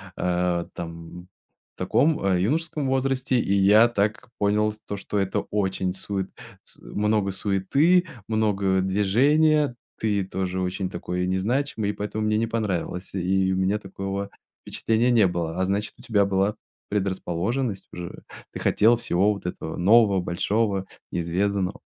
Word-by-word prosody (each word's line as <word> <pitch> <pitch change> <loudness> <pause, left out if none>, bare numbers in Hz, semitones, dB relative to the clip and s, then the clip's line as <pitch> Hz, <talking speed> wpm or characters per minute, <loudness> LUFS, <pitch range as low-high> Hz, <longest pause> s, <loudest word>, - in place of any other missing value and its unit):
э, 90 -1 0
там 85 +1 -8 0.5
в - - -64
таком 100 - +2
юношеском 150 - 0
возрасте, 130 -1 +1
и 100 - 0
я 105 +4 +6
так 115 +3 -1
понял 105 +1 +2
то, 100 - -3
что 100 +1 -4
это 95 -1 0
очень 95 -2 -1
сует 95 0 -4 0.3
с - - -15
много 105 -1 0
суеты, 135 - +2 0.2
много 100 -4 +1
движения. 135 +10 +3 0.2
Ты 105 -3 +1
тоже 95 -1 -3
очень 95 +1 -2
такой 90 0 -3
не 95 +1 0
значимый, 115 0 -1
и 105 - -1
поэтому 105 +1 -3
мне 105 0 +2
не 115 - +1
понравилось. 100 -5 -3
И 95 +1 +1
у - - -1
меня 95 +3 +1
такого 95 0 -5 0.3
впечатления 115 +2 0
не 110 -5 +5
было, 85 0 -3
а 95 - +2
значит, 100 +2 -1
у - - -15
тебя 105 -3 +2
была 100 +2 +1 0.3
предрасположенность 100 +3 -2
уже, 90 0 -8 0.3
ты - - -7
хотел 115 +3 +4
всего 100 -2 +2
вот 100 - -10
этого 90 -2 -5
нового, 100 +1 +5
большого, 100 +3 0 0.3
неизведанного. 95 +3 -1
100 Hz, 145 wpm, -25 LUFS, 95-110 Hz, 0.5 s, я